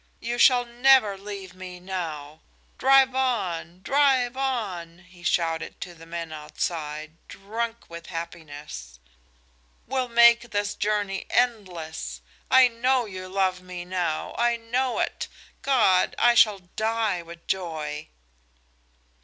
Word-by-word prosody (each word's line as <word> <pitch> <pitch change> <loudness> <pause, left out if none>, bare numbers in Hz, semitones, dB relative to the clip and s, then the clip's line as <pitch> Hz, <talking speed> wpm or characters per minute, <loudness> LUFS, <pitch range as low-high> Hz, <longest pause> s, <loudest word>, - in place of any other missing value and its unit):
You 240 +1 -3
shall 245 -2 +6
never 240 -3 +4
leave 195 -1 -8
me 185 -1 -9
now! 160 -5 -5 0.4
Drive 270 0 +5
on! 185 -9 -1
Drive 265 -3 +3
on!" 190 -10 -3
he 175 -1 -18
shouted 165 -2 -1
to 180 -1 -6
the 165 -1 -14
men 165 -1 -5
outside, 155 0 -4
drunk 225 +4 -5
with 170 0 -10
happiness. 145 - -8 0.9
"We'll 260 0 -1
make 235 0 +6
this 205 0 -1
journey 205 -2 -1
endless. 185 -10 -1 0.3
I 260 -1 +7
know 245 +1 +1
you 185 -3 -7
love 185 -1 0
me 180 -1 -7
now 175 -4 -2
I 235 0 +3
know 245 +2 -1
it! - - -2 0.3
God, 210 -9 +3
I 240 0 +5
shall 215 -3 +5
die 215 +1 -1
with 170 0 -12
joy!" 155 -5 -3
190 Hz, 120 wpm, -25 LUFS, 170-235 Hz, 0.9 s, I